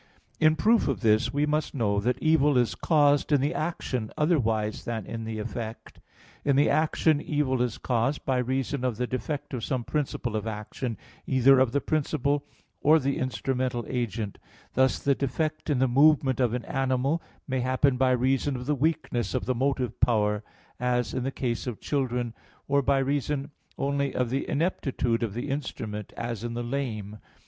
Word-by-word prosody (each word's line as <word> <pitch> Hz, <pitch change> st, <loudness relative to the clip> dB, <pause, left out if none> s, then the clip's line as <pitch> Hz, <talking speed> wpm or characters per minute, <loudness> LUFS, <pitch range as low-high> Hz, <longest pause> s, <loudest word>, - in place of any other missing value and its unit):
In 155 Hz, 0 st, +5 dB
proof 225 Hz, +6 st, +3 dB
of 135 Hz, -, -1 dB
this, 110 Hz, -2 st, +3 dB
we 145 Hz, +2 st, +1 dB
must 150 Hz, 0 st, -1 dB
know 105 Hz, -5 st, +1 dB
that 125 Hz, +4 st, 0 dB
evil 150 Hz, -3 st, +3 dB
is 120 Hz, -6 st, +2 dB
caused 145 Hz, -, +3 dB
in 145 Hz, -, +5 dB
the 145 Hz, +5 st, 0 dB
action 150 Hz, -9 st, -3 dB
otherwise 115 Hz, -10 st, +1 dB
than 115 Hz, -3 st, -4 dB
in 115 Hz, -1 st, -5 dB
the 110 Hz, -1 st, -4 dB
effect. 110 Hz, +1 st, -6 dB, 0.4 s
In 140 Hz, -, +2 dB
the 145 Hz, +2 st, +4 dB
action 155 Hz, -1 st, +2 dB
evil 135 Hz, -4 st, 0 dB
is 125 Hz, -3 st, -1 dB
caused 125 Hz, +4 st, -1 dB
by 130 Hz, -2 st, +1 dB
reason 130 Hz, +1 st, -1 dB
of 125 Hz, -4 st, 0 dB
the 125 Hz, -, 0 dB
defect 130 Hz, +4 st, -4 dB
of 120 Hz, -3 st, -3 dB
some 130 Hz, -3 st, -1 dB
principle 130 Hz, -5 st, -2 dB
of 110 Hz, +1 st, -2 dB
action, 110 Hz, +2 st, -4 dB, 0.3 s
either 130 Hz, 0 st, +5 dB
of 130 Hz, -3 st, +3 dB
the 140 Hz, -, +1 dB
principal 145 Hz, -2 st, 0 dB, 0.4 s
or 155 Hz, +2 st, +6 dB
the 140 Hz, -2 st, -1 dB
instrumental 125 Hz, 0 st, -1 dB
agent; 115 Hz, -4 st, -3 dB, 0.3 s
thus 130 Hz, +1 st, +3 dB
the 140 Hz, -, +2 dB
defect 155 Hz, +4 st, -2 dB
in 145 Hz, -, +2 dB
the 130 Hz, +1 st, +3 dB
movement 135 Hz, 0 st, +4 dB
of 125 Hz, -2 st, +2 dB
an 125 Hz, -, -4 dB
animal 135 Hz, +4 st, 0 dB, 0.3 s
may 130 Hz, -2 st, -1 dB
happen 130 Hz, +2 st, +2 dB
by 130 Hz, +1 st, +3 dB
reason 130 Hz, +2 st, +1 dB
of 125 Hz, 0 st, -5 dB
the 150 Hz, -, +1 dB
weakness 140 Hz, -4 st, -1 dB
of 130 Hz, -, -1 dB
the 130 Hz, -, +1 dB
motive 130 Hz, -2 st, -1 dB
power, 105 Hz, -3 st, +2 dB, 0.4 s
as 125 Hz, -2 st, 0 dB
in -, -, -1 dB
the 130 Hz, -, -1 dB
case 120 Hz, -2 st, -2 dB
of 120 Hz, -4 st, -4 dB
children, 125 Hz, -4 st, -1 dB, 0.3 s
or 140 Hz, 0 st, +3 dB
by 140 Hz, 0 st, +2 dB
reason 140 Hz, +1 st, -1 dB, 0.3 s
only 140 Hz, 0 st, -1 dB
of 125 Hz, -2 st, 0 dB
the 135 Hz, +1 st, -1 dB
ineptitude 135 Hz, -7 st, 0 dB
of 110 Hz, -3 st, -2 dB
the 120 Hz, +4 st, -3 dB
instrument, 110 Hz, -7 st, -4 dB
as 115 Hz, -2 st, -4 dB
in 120 Hz, 0 st, -4 dB
the 120 Hz, -, -2 dB
lame. 110 Hz, -5 st, -4 dB
130 Hz, 180 wpm, -27 LUFS, 120-140 Hz, 0.4 s, or